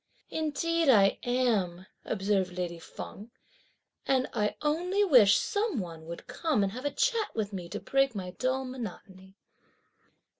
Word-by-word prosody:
"Indeed 320 +1 0
I 200 -6 +5
am," 215 -8 0 0.2
observed 195 -3 0
lady 175 -2 -3
Feng, 205 +6 -9 0.8
"and 260 -1 +2
I 210 -2 0
only 355 +7 +1
wish 245 - +7
some 410 - 0
one 165 -4 -7
would 170 0 -7
come 305 -11 0
and 195 - 0
have 255 +6 -7
a - - +2
chat 465 - 0
with 210 -2 -2
me 180 -3 -6
to - - -4
break 270 -3 +1
my 185 -2 -4
dull 260 +7 -1
monotony." 195 -6 -8
230 Hz, 145 wpm, -29 LUFS, 190-290 Hz, 0.8 s, wish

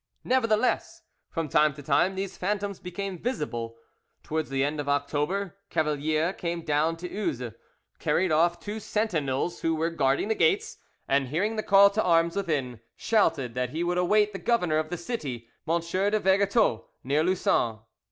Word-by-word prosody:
'" - - -49
Nevertheless, 250 -2 +1 0.3
from 165 -2 -3
time 150 +1 +3
to 145 - -10
time, 155 +7 +2
these 190 0 -4
phantoms 200 0 -2
became 185 0 -5
visible. 120 - -3 0.5
Towards 155 0 -2
the 135 0 0
end 145 +2 -1
of 145 -1 -3
October, 150 +7 -1
Cavalier 155 +2 0
came 170 -2 -4
down 155 +3 +1
to 180 +2 -6
Uzes, 145 - -3 0.5
carried 185 -1 +1
off 170 +2 +3
two 210 +1 -5
sentinels 175 -8 -1
who 165 0 +1
were 165 +2 0
guarding 140 0 +1
the 220 - +2
gates, 430 - +1 0.3
and 135 -1 +2
hearing 190 - -1
the 215 - -1
call 200 -1 +6
to 215 +2 +1
arms 170 -2 +3
within, 145 - -2 0.2
shouted 160 - +1
that 125 0 -1
he 160 +5 -2
would 175 +1 0
await 210 +3 +3
the - - -5
governor 180 -10 +1
of 155 0 -3
the 175 - -3
city, 145 - -5 0.2
M. 170 +1 +3
de 190 +5 0
Vergetot, 200 - +2 0.2
near 145 +4 +1
Lussan. 120 - +1
170 Hz, 170 wpm, -27 LUFS, 145-200 Hz, 0.5 s, call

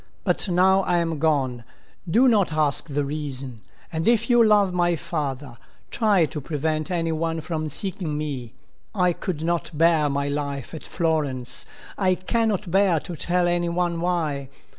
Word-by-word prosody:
But - - +1
now 190 +2 +4
I 180 -2 +1
am 165 -3 -1
gone. 135 -6 0 0.5
Do 240 +10 +4
not 210 -8 +3
ask 155 0 +4
the 145 -1 -1
reason; 135 -5 -2 0.3
and 160 +1 -2
if 230 +1 +3
you 240 -1 +6
love 205 -4 +3
my 175 -1 +2
father, 145 -6 -4 0.3
try 205 -7 +3
to 150 0 -5
prevent 155 +2 -2
any 165 -2 -1
one 165 +1 -2
from 155 -1 -4
seeking 175 -2 -2
me. 135 -6 -5 0.4
I 180 -2 +2
could 165 -4 -4
not 170 0 -1
bear 160 -2 +3
my 140 0 -1
life 140 -2 -4
at 160 - -7
Florence. 150 -7 0 0.3
I 185 -2 +3
cannot 210 0 -1
bear 190 -3 +3
to 175 - -6
tell 175 +2 +1
any 175 0 0
one 170 -1 -1
why. 155 -6 -1
165 Hz, 160 wpm, -23 LUFS, 150-180 Hz, 0.5 s, you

